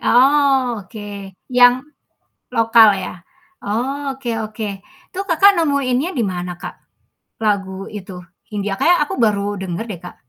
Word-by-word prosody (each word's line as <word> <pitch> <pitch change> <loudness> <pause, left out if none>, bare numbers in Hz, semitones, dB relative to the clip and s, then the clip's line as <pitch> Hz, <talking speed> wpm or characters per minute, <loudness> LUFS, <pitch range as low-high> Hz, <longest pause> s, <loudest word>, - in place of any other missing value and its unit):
Oh, 265 -3 +3
oke 205 +3 -11 0.6
yang, 245 0 +8 0.8
lokal 225 -1 +6
ya? - - -4 0.5
Oke 270 +4 -3
oke, 215 +1 -6 0.4
itu 375 - -8
Kakak 345 +5 +6
nemuinnya 280 -2 +1
di 235 - +1
mana, 180 0 -4
Kak? - - -6 0.7
Lagu 200 -3 0 0.2
itu, 190 -1 -8 0.4
Hindia, 205 -2 -2
kayaknya 350 +1 +4
aku - - -5
baru 210 -3 +2 0.2
denger 180 +3 -4
deh, 180 -5 -6
Kak. 180 - -9
230 Hz, 130 wpm, -19 LUFS, 205-275 Hz, 0.8 s, yang